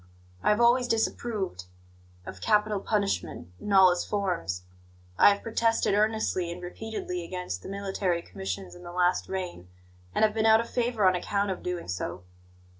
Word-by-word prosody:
I -, -, +2 dB
have 210 Hz, +1 st, +3 dB
always 240 Hz, +1 st, +4 dB
disapproved 220 Hz, -, -1 dB, 0.6 s
of 95 Hz, -, -9 dB
capital 210 Hz, -1 st, +2 dB
punishment 200 Hz, -, -2 dB
in 210 Hz, -, -5 dB
all 190 Hz, -2 st, +7 dB
its 175 Hz, -, -1 dB
forms; 175 Hz, -, -2 dB, 0.6 s
I -, -, +9 dB
have 200 Hz, 0 st, 0 dB
protested 230 Hz, -2 st, +1 dB
earnestly 210 Hz, -4 st, +1 dB
and 175 Hz, -, -6 dB
repeatedly 180 Hz, -1 st, -5 dB
against 180 Hz, -, -5 dB
the -, -, -9 dB
military 195 Hz, -3 st, -1 dB
commissions 195 Hz, 0 st, -6 dB
in 175 Hz, -, -12 dB
the 175 Hz, -1 st, -9 dB
last 180 Hz, 0 st, +1 dB
reign, 180 Hz, -, -5 dB, 0.5 s
and -, -, +5 dB
have 215 Hz, -, 0 dB
been 220 Hz, 0 st, +2 dB
out 220 Hz, 0 st, +7 dB
of 230 Hz, -, -2 dB
favour 235 Hz, -4 st, 0 dB
on 185 Hz, -, +6 dB
account 200 Hz, +2 st, -1 dB
of 185 Hz, -, -5 dB
doing 180 Hz, -1 st, -4 dB
so. 90 Hz, 0 st, -4 dB
195 Hz, 170 wpm, -28 LUFS, 175-215 Hz, 0.6 s, I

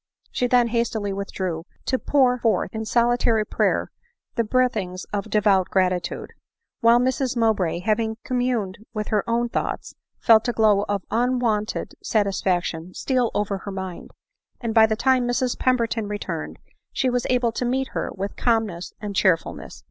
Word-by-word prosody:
She 250 Hz, -, 0 dB
then 245 Hz, -1 st, +3 dB
hastily 225 Hz, -3 st, -1 dB
withdrew, 185 Hz, -4 st, -3 dB, 0.2 s
to 260 Hz, -, 0 dB
pour 255 Hz, -3 st, +3 dB
forth 230 Hz, -2 st, +1 dB
in 220 Hz, 0 st, -4 dB
solitary 235 Hz, -1 st, +2 dB
prayer -, -, 0 dB, 0.4 s
the 230 Hz, -, +1 dB
breathings 210 Hz, -6 st, 0 dB
of 200 Hz, -1 st, -2 dB
devout 200 Hz, -3 st, +3 dB
gratitude; 185 Hz, -2 st, 0 dB, 0.3 s
— -, -, -59 dB
while 230 Hz, +1 st, +6 dB
Mrs 255 Hz, 0 st, 0 dB
Mowbray, 200 Hz, -7 st, +1 dB
having 220 Hz, +2 st, 0 dB
communed 245 Hz, -7 st, -1 dB, 0.2 s
with 210 Hz, -1 st, -3 dB
her 210 Hz, -2 st, +1 dB
own 235 Hz, +1 st, +1 dB
thoughts, -, -, -3 dB, 0.3 s
felt 225 Hz, 0 st, +5 dB
a 240 Hz, -, 0 dB
glow 210 Hz, -3 st, +3 dB
of 200 Hz, -2 st, -1 dB
unwonted 235 Hz, -2 st, 0 dB
satisfaction 185 Hz, -4 st, -1 dB
steal 255 Hz, -3 st, +1 dB
over 205 Hz, -1 st, -1 dB
her 200 Hz, -, -7 dB
mind; 190 Hz, -2 st, -6 dB, 0.5 s
and 230 Hz, -2 st, -3 dB
by 220 Hz, -1 st, +7 dB
the 220 Hz, -, 0 dB
time 255 Hz, +1 st, +2 dB
Mrs 245 Hz, 0 st, 0 dB
Pemberton 230 Hz, -4 st, +1 dB
returned, 190 Hz, -6 st, -5 dB, 0.3 s
she 255 Hz, -, 0 dB
was 245 Hz, -1 st, 0 dB
able 245 Hz, -2 st, +2 dB
to 230 Hz, -, -3 dB
meet 260 Hz, +2 st, 0 dB
her -, -, -3 dB
with 195 Hz, +1 st, -4 dB
calmness 220 Hz, -7 st, -1 dB
and 205 Hz, -2 st, -5 dB
cheerfulness. 180 Hz, -5 st, 0 dB
220 Hz, 155 wpm, -23 LUFS, 200-245 Hz, 0.5 s, by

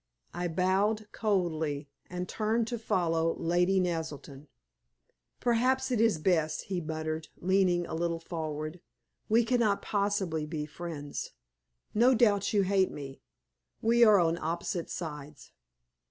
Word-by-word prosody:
I 175 Hz, +1 st, -2 dB
bowed 195 Hz, +5 st, +1 dB
coldly, 160 Hz, -8 st, -1 dB, 0.2 s
and 180 Hz, 0 st, -4 dB
turned 220 Hz, +1 st, 0 dB
to 240 Hz, -, -3 dB
follow 165 Hz, -6 st, +1 dB
Lady 180 Hz, +3 st, +2 dB
Naselton. 160 Hz, -5 st, -4 dB, 0.9 s
"Perhaps 255 Hz, +2 st, +2 dB
it 235 Hz, -3 st, +2 dB
is 225 Hz, -7 st, +3 dB
best," 155 Hz, -2 st, +1 dB
he 185 Hz, -2 st, -3 dB
murmured, 155 Hz, 0 st, -4 dB
leaning 180 Hz, -1 st, +2 dB
a -, -, -7 dB
little 170 Hz, 0 st, -1 dB
forward. 155 Hz, -1 st, -5 dB, 0.5 s
"We 230 Hz, +2 st, +4 dB
cannot 230 Hz, -4 st, +2 dB
possibly 200 Hz, -7 st, -1 dB
be 150 Hz, -1 st, -3 dB
friends; 150 Hz, -2 st, -6 dB, 0.6 s
no 245 Hz, +4 st, +5 dB
doubt 205 Hz, -4 st, +3 dB
you 205 Hz, -2 st, +3 dB
hate 190 Hz, 0 st, +2 dB
me; 135 Hz, -2 st, -8 dB, 0.6 s
we 235 Hz, +1 st, +4 dB
are 215 Hz, -3 st, +7 dB
on 170 Hz, 0 st, +2 dB
opposite 170 Hz, +1 st, -3 dB
sides. 150 Hz, -3 st, -7 dB
175 Hz, 125 wpm, -30 LUFS, 160-210 Hz, 0.9 s, are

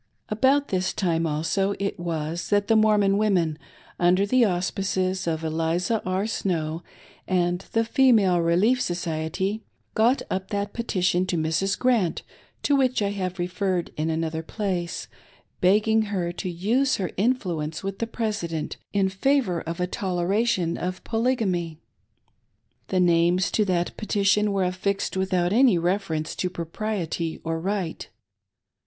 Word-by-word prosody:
About 265 Hz, +6 st, +2 dB
this 185 Hz, -1 st, 0 dB
time, 165 Hz, -3 st, 0 dB
also, 165 Hz, +6 st, 0 dB
it 200 Hz, -2 st, -3 dB
was 165 Hz, -1 st, -3 dB
that 205 Hz, -1 st, +2 dB
the 225 Hz, -, +4 dB
Mormon 210 Hz, -2 st, +4 dB
women, 175 Hz, -7 st, +1 dB, 0.4 s
under 180 Hz, +3 st, +4 dB
the 255 Hz, +4 st, +3 dB
auspices 185 Hz, -1 st, 0 dB
of 160 Hz, -1 st, -1 dB
Eliza 165 Hz, +7 st, 0 dB
R. 185 Hz, +2 st, 0 dB
Snow 165 Hz, -7 st, -2 dB, 0.5 s
and 175 Hz, -1 st, +1 dB
the 225 Hz, 0 st, +2 dB
Female 225 Hz, -9 st, +4 dB
Relief 195 Hz, +10 st, +3 dB
Society, 175 Hz, +4 st, -2 dB, 0.3 s
got 235 Hz, +5 st, +3 dB
up 190 Hz, 0 st, -2 dB
that 205 Hz, 0 st, -2 dB
petition 185 Hz, -5 st, 0 dB
to 175 Hz, -, -1 dB
Mrs. 160 Hz, +5 st, 0 dB
Grant, 235 Hz, -9 st, +1 dB, 0.4 s
to 290 Hz, -, +3 dB
which 255 Hz, -4 st, +2 dB
I 200 Hz, -, +1 dB
have 185 Hz, -2 st, -3 dB
referred 180 Hz, 0 st, -1 dB
in 155 Hz, +1 st, -1 dB
another 160 Hz, 0 st, -1 dB
place, 180 Hz, -2 st, -3 dB, 0.5 s
begging 215 Hz, +4 st, +4 dB
her 185 Hz, -4 st, -2 dB
to 180 Hz, +2 st, -5 dB
use 230 Hz, +10 st, +1 dB
her 185 Hz, -3 st, -3 dB
influence 180 Hz, -9 st, -1 dB
with 195 Hz, 0 st, -4 dB
the 230 Hz, -, -1 dB
President 205 Hz, -9 st, -3 dB, 0.2 s
in 200 Hz, -1 st, +3 dB
favor 190 Hz, -2 st, +1 dB
of 165 Hz, +1 st, -5 dB
a 180 Hz, -, +1 dB
toleration 185 Hz, 0 st, 0 dB
of 180 Hz, 0 st, -4 dB
Polygamy. 220 Hz, -9 st, 0 dB, 1.1 s
The 185 Hz, -, 0 dB
names 175 Hz, 0 st, +3 dB
to 215 Hz, -, +2 dB
that 175 Hz, -2 st, -1 dB
petition 210 Hz, -1 st, +2 dB
were 195 Hz, -1 st, +1 dB
affixed 190 Hz, +2 st, -1 dB
without 185 Hz, -1 st, +1 dB
any 240 Hz, -5 st, +5 dB
reference 170 Hz, -3 st, -1 dB
to 180 Hz, -, -1 dB
propriety 170 Hz, -1 st, -3 dB
or 165 Hz, 0 st, -2 dB
right. 185 Hz, -2 st, -3 dB
185 Hz, 140 wpm, -25 LUFS, 170-210 Hz, 1.1 s, any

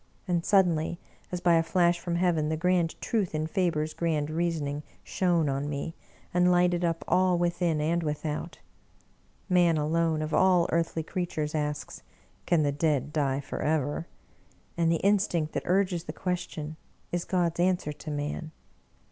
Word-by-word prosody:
And 175 Hz, -2 st, +1 dB
suddenly, 175 Hz, -5 st, +2 dB, 0.3 s
as 180 Hz, -1 st, -3 dB
by 175 Hz, -2 st, +5 dB
a -, -, +4 dB
flash 175 Hz, +1 st, +2 dB
from 170 Hz, 0 st, -3 dB
heaven, 170 Hz, -4 st, +1 dB
the 160 Hz, -, -1 dB
grand 175 Hz, 0 st, +1 dB
truth 200 Hz, -8 st, -1 dB
in 155 Hz, 0 st, 0 dB
Faber's 160 Hz, -2 st, 0 dB
grand 155 Hz, -3 st, -1 dB
reasoning 155 Hz, -3 st, -1 dB, 0.2 s
shone 175 Hz, -4 st, +1 dB
on 140 Hz, +1 st, -1 dB
me, 145 Hz, +3 st, -4 dB, 0.4 s
and 180 Hz, 0 st, +4 dB
Hghted 175 Hz, 0 st, +3 dB
up 165 Hz, -1 st, -1 dB
all, 180 Hz, 0 st, +3 dB
within 170 Hz, -2 st, +1 dB
and 165 Hz, +3 st, +1 dB
without. 150 Hz, +1 st, -3 dB, 0.9 s
Man 175 Hz, -4 st, +4 dB
alone, 160 Hz, +1 st, +1 dB
of 155 Hz, 0 st, -4 dB
all 180 Hz, -1 st, +4 dB
earthly 165 Hz, -1 st, 0 dB
creatures, 155 Hz, -3 st, -3 dB
asks, 150 Hz, -1 st, -3 dB, 0.2 s
" -, -, -35 dB
Can 165 Hz, -3 st, +3 dB
the 145 Hz, -, +2 dB
dead 145 Hz, -1 st, 0 dB
die 140 Hz, -2 st, 0 dB
forever? 150 Hz, +2 st, -1 dB, 0.3 s
" -, -, -34 dB
and 165 Hz, -1 st, +2 dB
the 165 Hz, -, +1 dB
instinct 185 Hz, -6 st, +2 dB
that -, -, -3 dB
urges 180 Hz, -2 st, +1 dB
the -, -, -5 dB
question 160 Hz, -4 st, -4 dB, 0.3 s
is 175 Hz, -1 st, -1 dB
God's 175 Hz, -2 st, 0 dB
answer 175 Hz, -4 st, +1 dB
to 150 Hz, +2 st, -9 dB
man. 150 Hz, +2 st, -3 dB
165 Hz, 160 wpm, -28 LUFS, 155-175 Hz, 0.9 s, by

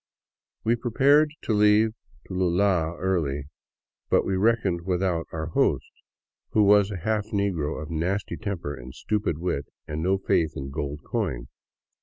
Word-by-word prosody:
We 115 Hz, +2 st, +3 dB
prepared 140 Hz, +6 st, +3 dB
to 110 Hz, -, 0 dB
leave 105 Hz, +1 st, +5 dB, 0.4 s
Tulua 90 Hz, -2 st, +1 dB
early, 80 Hz, -7 st, 0 dB, 0.7 s
but -, -, +3 dB
we 95 Hz, -, 0 dB
reckoned 100 Hz, -4 st, +2 dB
without 90 Hz, -2 st, -1 dB
our 80 Hz, -1 st, -3 dB
host, -, -, +1 dB, 0.6 s
who 105 Hz, -, +5 dB
was 100 Hz, 0 st, +5 dB
a 100 Hz, -, -4 dB
half 105 Hz, +3 st, -1 dB
negro 95 Hz, -9 st, -1 dB
of 75 Hz, 0 st, -7 dB
nasty 90 Hz, +5 st, -1 dB
temper 95 Hz, -9 st, -4 dB
and 65 Hz, -2 st, -10 dB
stupid 105 Hz, -7 st, -1 dB
wit, 85 Hz, -4 st, -2 dB, 0.2 s
and 75 Hz, 0 st, -3 dB
no 95 Hz, +3 st, +2 dB
faith 85 Hz, -4 st, +1 dB
in 70 Hz, 0 st, -5 dB
gold 75 Hz, 0 st, -4 dB
coin. -, -, -3 dB
95 Hz, 145 wpm, -26 LUFS, 80-105 Hz, 0.7 s, leave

